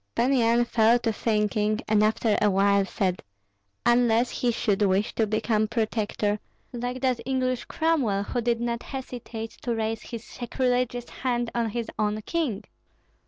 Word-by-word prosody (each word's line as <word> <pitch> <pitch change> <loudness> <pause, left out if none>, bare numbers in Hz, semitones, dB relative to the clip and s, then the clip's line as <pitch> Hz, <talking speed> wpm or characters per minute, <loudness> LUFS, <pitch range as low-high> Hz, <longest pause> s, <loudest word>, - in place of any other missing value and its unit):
Pan 255 +3 +2
Yan 235 -1 +3
fell 230 0 +4
to 230 -2 -1
thinking, 210 0 0
and 210 0 +4
after 215 0 +2
a 210 - +4
while 200 0 +3
said, 190 -2 -1 0.6
"Unless 240 0 +3
he 245 - 0
should 210 -3 0
wish 200 +2 +2
to 220 - +1
become 215 0 +1
protector, 215 -2 -1 0.3
like 245 +1 -4
that 255 -3 +1
English 255 -1 -1
Cromwell 275 -12 +1
who 245 +4 -2
did 235 0 +1
not 235 0 -2
hesitate 240 -4 -6
to 240 -2 -1
raise 220 0 -2
his 230 -1 -7
sacrilegious 245 0 -1
hand 240 -2 -2
on 235 -1 0
his 235 +2 -3
own 210 0 +1
king." 270 - -2
230 Hz, 155 wpm, -26 LUFS, 215-245 Hz, 0.6 s, fell